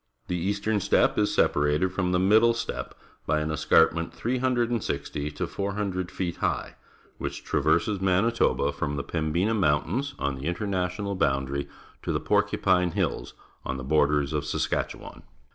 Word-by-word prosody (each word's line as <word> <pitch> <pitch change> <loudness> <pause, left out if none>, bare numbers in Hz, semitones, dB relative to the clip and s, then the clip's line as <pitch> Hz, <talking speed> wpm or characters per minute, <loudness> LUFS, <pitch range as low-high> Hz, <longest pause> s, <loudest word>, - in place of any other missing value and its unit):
The 90 0 -1
e - - +2
as 100 0 -1
tern 105 +1 0
steppe 100 - +2
is 105 - +2
sepa 75 - +2
rated 75 +6 +1
from 95 -1 0
the 90 - +3
middle 110 +5 +4
ste 115 - -2
ppe - - -6 0.3
by 75 +2 +2
an 75 0 -2
escnrpment. 80 +2 +3
360 120 - -1
to 75 - -3
400 100 -2 -3
feet 90 -3 -3
high, - - -2 0.5
which - - -5
traverses 85 +7 +1
jVIanitoba 95 +5 +2
from 75 0 -2
the 70 - -3
Pembina 85 +6 0
Mountains 115 - 0
on 70 -1 -1
the 65 +3 -5
international 95 +1 -2
boundary 70 -6 0 0.3
to - - -3
the - - 0
Porcupine 90 -2 +2
Hills - - -2 0.3
on 65 - -3
the 65 - -6
borders 75 0 +2
of 75 -1 0
Saskatchewan. 75 - -3
90 Hz, 160 wpm, -26 LUFS, 75-100 Hz, 0.5 s, middle